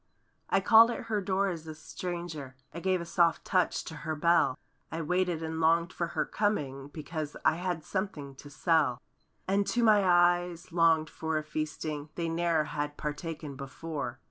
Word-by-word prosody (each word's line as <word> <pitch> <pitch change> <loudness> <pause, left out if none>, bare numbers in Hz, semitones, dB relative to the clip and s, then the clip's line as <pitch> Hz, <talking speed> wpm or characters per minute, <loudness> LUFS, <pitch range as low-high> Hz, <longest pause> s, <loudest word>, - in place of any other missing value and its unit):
I 195 - +3
called 225 +3 +7
at 240 - -3
her 215 -2 -1
door 195 +1 +1
as 165 -3 -6
a 155 - -6
stranger; 160 -5 -6 0.2
I 170 - -5
gave 185 0 +1
a - - -5
soft 170 0 +2
touch 185 -2 +1
to 160 - -8
her 155 +1 -3
bell; 170 -4 +3 0.3
I 165 - -3
waited 180 0 0
and 160 0 -3
longed 165 +1 +3
for 170 - -2
her - - +2
coming 140 -10 -1
Because—I 155 +1 -2
had 175 -3 -2
something 155 -9 -4
to 145 - -11
sell. 160 -4 +2 0.5
And, 200 +1 +1
too, 240 - +1
my 210 -3 +6
eyes 175 -1 +3
longed 165 -2 +3
for 160 -1 -2
a 155 - -2
feasting 155 -1 -4
They 170 -1 -2
ne'er 165 -1 +1
had 145 0 -4
partaken 150 -1 -5
before. 140 -1 -5
165 Hz, 170 wpm, -30 LUFS, 155-180 Hz, 0.5 s, called